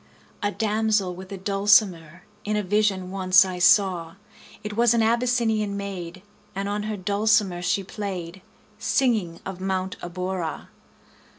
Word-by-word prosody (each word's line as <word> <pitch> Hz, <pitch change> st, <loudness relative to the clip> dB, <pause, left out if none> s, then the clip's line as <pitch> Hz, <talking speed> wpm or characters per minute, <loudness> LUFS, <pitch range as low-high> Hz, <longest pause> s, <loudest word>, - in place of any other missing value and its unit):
A 205 Hz, -, +1 dB
damsel 215 Hz, -3 st, 0 dB
with 185 Hz, +2 st, -11 dB
a 195 Hz, -, -5 dB
dulcimer 190 Hz, -4 st, +2 dB, 0.2 s
In 210 Hz, +1 st, -1 dB
a 210 Hz, -, 0 dB
vision 195 Hz, -2 st, 0 dB
once 190 Hz, 0 st, +5 dB
I 185 Hz, -1 st, -5 dB
saw: 180 Hz, -3 st, +3 dB, 0.5 s
It 210 Hz, 0 st, -5 dB
was 235 Hz, +1 st, +4 dB
an 230 Hz, -, +3 dB
Abyssinian 225 Hz, -3 st, +1 dB
maid, 185 Hz, -2 st, -6 dB, 0.3 s
And 195 Hz, +1 st, -3 dB
on 205 Hz, +1 st, -2 dB
her 215 Hz, -, -3 dB
dulcimer 200 Hz, -1 st, +1 dB
she 195 Hz, +2 st, 0 dB
play'd, 190 Hz, -3 st, -6 dB
40 -, -, -19 dB, 0.4 s
Singing 220 Hz, -11 st, 0 dB
of 190 Hz, -1 st, -7 dB
Mount 190 Hz, 0 st, -2 dB
Abora. 180 Hz, -1 st, -4 dB
195 Hz, 140 wpm, -24 LUFS, 185-210 Hz, 0.5 s, once